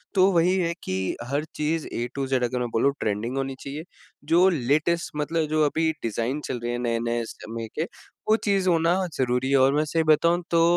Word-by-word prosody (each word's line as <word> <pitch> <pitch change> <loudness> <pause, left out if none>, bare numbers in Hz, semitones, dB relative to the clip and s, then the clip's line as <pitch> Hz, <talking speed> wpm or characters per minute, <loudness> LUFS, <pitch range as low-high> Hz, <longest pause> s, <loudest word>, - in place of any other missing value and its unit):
तो 190 +1 +5
वही 175 +2 +3
है 170 -2 0
कि 95 0 -2
हर 145 +2 0
चीज़ 155 +1 -1
ए 120 - -2
टू 135 -1 -2
ज़ 130 - 0
अगर 125 +1 -1
मैं 120 -1 -2
बोलूँ 140 +5 +2
ट्रेंडिंग 110 +5 -2
होनी 135 0 -2
चाहिए 145 +3 -6 0.5
जो 180 +3 +6
लेटेस्ट 155 +3 0
मतलब 155 +1 -1
जो 155 0 +2
अभी 160 +2 +1
डिज़ाइन 115 +5 -1
चल 125 - -3
रहे 120 +1 -3
हैं 120 - -2
नए-नए 115 0 -1
समय 115 0 -7
के 155 - 0 0.5
वो 220 - +6
चीज़ 195 -2 +2
होना 165 0 +3 0.2
ज़रूरी 125 +1 0
है 140 - +5
और 135 +1 +4
मैं 150 - +2
सही 160 +2 0
बताऊँ 170 +3 +3
तो 165 -1 +4
140 Hz, 205 wpm, -25 LUFS, 120-165 Hz, 0.5 s, जो